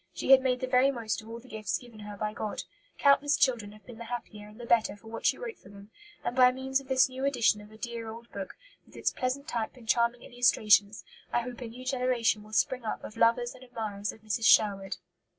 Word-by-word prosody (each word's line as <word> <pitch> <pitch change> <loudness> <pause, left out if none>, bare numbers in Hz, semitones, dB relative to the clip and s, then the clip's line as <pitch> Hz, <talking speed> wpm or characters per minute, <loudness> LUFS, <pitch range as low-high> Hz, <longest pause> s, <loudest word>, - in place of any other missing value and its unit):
She - - 0
had 265 -1 +9
made 255 -1 0
the 255 - -1
very 255 +1 +4
most 230 -6 -3
of 220 - -14
all 230 - -6
the 245 - -17
gifts 215 -6 -2
given 235 -1 -14
her 210 -1 -8
by 210 +1 -2
God. 215 -1 -4 0.3
Countless 285 +1 +4
children 230 -6 +1
have 215 0 -17
been 240 -2 -11
the 235 - -7
happier 220 -3 -7
and 210 +2 -15
the 240 - -7
better 230 -3 +2
for 220 +2 -14
what 230 - -2
she - - +2
wrote 475 -2 -7
for - - -16
them. 200 +1 -14 0.3
And 240 - -2
by 250 -1 +7
means 265 +1 -1
of 275 - -14
this 260 0 +4
new 260 0 -7
edition 245 -6 +2
of 210 +1 -15
a 220 - -14
dear 235 0 -5
old 230 +1 -10
book, 195 -2 -6 0.3
with - - -19
its - - 0
pleasant 265 +3 -2
type 235 -3 -3
and 235 -3 -15
charming 235 +1 +2
illustrations, 215 -4 +3 0.3
I 240 - +2
hope 245 +1 -8
a 240 - -5
new 245 +3 -10
generation 250 -4 +1
will 215 +1 -15
spring 255 +2 +1
up 220 - -4
of - - -9
lovers 230 +1 +2
and 255 - -14
admirers 215 -4 -4
of 220 - -17
Mrs. 220 +1 -2
Sherwood. 195 -6 +4
235 Hz, 245 wpm, -29 LUFS, 215-255 Hz, 0.3 s, had